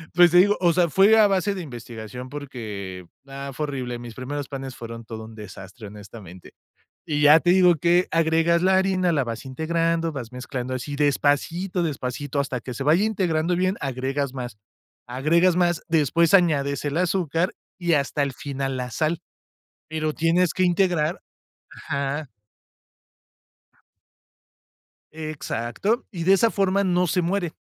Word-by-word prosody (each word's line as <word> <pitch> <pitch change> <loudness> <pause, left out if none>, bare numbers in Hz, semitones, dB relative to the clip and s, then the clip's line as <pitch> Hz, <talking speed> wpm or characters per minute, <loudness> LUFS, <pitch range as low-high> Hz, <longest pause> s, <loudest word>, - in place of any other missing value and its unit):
pues, 175 -1 +7
te 175 - +5
digo, 205 +3 +5
o 175 -2 +3
sea, 175 -1 +2
fue 200 +7 +5
a 215 - +7
base 195 0 +1
de 185 - -5
investigación 120 -3 -8
porque, 105 -10 -7 0.2
ah, 140 0 -7
fue 150 +4 -2
horrible, 125 -4 -4
mis 120 -2 -9
primeros 140 +2 -5
panes 135 -2 -7
fueron 115 0 -8
todo 110 -1 -7
un 110 0 -12
desastre, 105 +1 -10
honestamente. 100 -3 -12 0.5
Y 150 -1 -1
ya 150 +2 +8
te 175 - +2
digo 180 -1 +6
que 175 +3 +3
agregas 165 +1 +2
la 190 0 +4
harina, 190 -2 +2
la 145 -5 +1
vas 115 +1 -6
integrando, 165 +4 -1
vas 125 -5 -6
mezclando 125 0 -5
así, 130 +3 -5
despacito, 150 +6 0
despacito, 145 -2 -3
hasta 135 -3 -1
que 125 0 -7
se 135 - -4
vaya 165 +8 +4
integrando 180 -5 0
bien, 185 +2 +1
agregas 135 +1 -2
más, 125 -5 -7 0.5
agregas 165 +8 +2
más, 175 -2 +1
después 165 +2 +2
añades 145 -7 +3
el 145 +3 -1
azúcar 180 -1 0 0.2
y 175 -2 +1
hasta 140 0 0
el 140 - -1
final, 135 -2 -4
la 125 -1 -4
sal, 155 +6 -1 0.7
pero 155 -1 -2
tienes 165 +2 +2
que 185 - +1
integrar 175 -2 +1 0.5
Ajá. 140 0 -4 2.8
Exacto, 155 - -3
y 170 -4 -5
de 190 - +5
esa 220 +4 +3
forma 195 0 +1
no 180 -1 +2
se 180 +3 +1
muere. 175 -1 -1
150 Hz, 155 wpm, -24 LUFS, 130-175 Hz, 2.8 s, ya